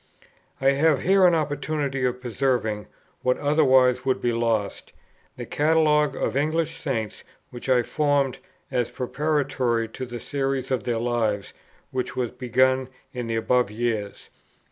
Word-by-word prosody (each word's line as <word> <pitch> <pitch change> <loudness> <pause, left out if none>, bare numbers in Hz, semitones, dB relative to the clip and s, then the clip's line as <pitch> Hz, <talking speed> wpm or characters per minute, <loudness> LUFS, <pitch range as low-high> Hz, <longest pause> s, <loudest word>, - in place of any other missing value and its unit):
I 135 +1 +4
have 140 0 +2
here 190 0 +5
an 175 - +4
opportunity 145 -2 -2
of 125 0 -2
preserving, 120 -4 -1 0.3
what 125 0 +1
otherwise 130 -4 +3
would 130 -1 +1
be 120 - 0
lost, 115 -4 -1 0.4
the - - -5
Catalogue 150 -2 +2
of - - -2
English 160 +3 0
Saints 115 -7 -3 0.3
which 120 +2 -7
I 125 -2 +4
formed, 145 -1 0 0.3
as 125 -3 0
preparatory 130 -4 -1
to 130 +3 -6
the 120 0 -6
Series 135 -1 -2
of 130 - -1
their 120 -2 0
Lives 115 -4 -1 0.4
which 130 -1 -3
was 125 -3 -1
begun 130 +1 +1 0.3
in 125 -2 -4
the 115 - -1
above 125 +1 +2
years. 110 -2 -3
130 Hz, 145 wpm, -24 LUFS, 120-145 Hz, 0.4 s, here